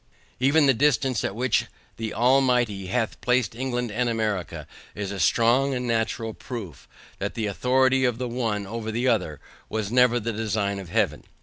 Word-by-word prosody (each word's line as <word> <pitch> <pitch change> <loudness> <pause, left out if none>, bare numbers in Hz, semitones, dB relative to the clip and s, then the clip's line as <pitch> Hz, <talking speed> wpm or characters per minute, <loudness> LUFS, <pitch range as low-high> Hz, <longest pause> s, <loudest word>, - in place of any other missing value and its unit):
Even 140 +4 +4
the 135 - +5
distance 130 -2 +1
at 95 - -2
which 125 -1 +1 0.3
the 110 -1 -4
Almighty 125 -5 +2
hath 115 +3 -2
placed 125 -1 +1
England 125 -1 -3
and 120 +3 0
America, 110 -5 -2 0.3
is 100 -1 -4
a 100 - -5
strong 120 - +3
and 125 0 -3
natural 115 -1 -1
proof, 100 - -8 0.3
that - - -3
the 110 - -2
authority 130 +5 +2
of 125 -3 +1
the 125 0 -3
one, 115 -4 -2
over 110 +2 -5
the 120 +4 -1
other, 90 - 0 0.3
was 110 -1 -3
never 125 -1 +4
the 115 0 -3
design 105 -2 -1
of 95 -3 -9
Heaven. - - 0
115 Hz, 175 wpm, -25 LUFS, 105-125 Hz, 0.3 s, the